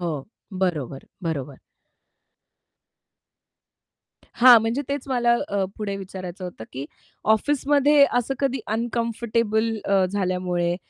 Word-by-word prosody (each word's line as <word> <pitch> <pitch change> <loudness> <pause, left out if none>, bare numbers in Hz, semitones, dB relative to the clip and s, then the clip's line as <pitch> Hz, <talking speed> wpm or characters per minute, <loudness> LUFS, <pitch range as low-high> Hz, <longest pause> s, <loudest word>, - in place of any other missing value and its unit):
हो. 155 -6 -3 0.4
बरोबर, 145 -7 -3 0.2
बरोबर. 145 -5 -4 2.8
हां, 245 -1 +10
म्हणजे 225 +5 -1
तेच 280 -1 -3
मला 240 -2 +2 0.2
अ, 200 -1 0
पुढे 200 -2 -3
विचारायचं 185 -1 -7
होतं 175 -11 -8
की 135 +2 -5 0.5
ऑफिसमध्ये 290 +3 +3
असं 245 +3 -2
कधी 270 -2 0
अनकम्फर्टेबल 230 -1 -1
अ, 195 -1 +3
झाल्यामुळे 180 -2 -1
210 Hz, 100 wpm, -23 LUFS, 180-240 Hz, 2.8 s, हां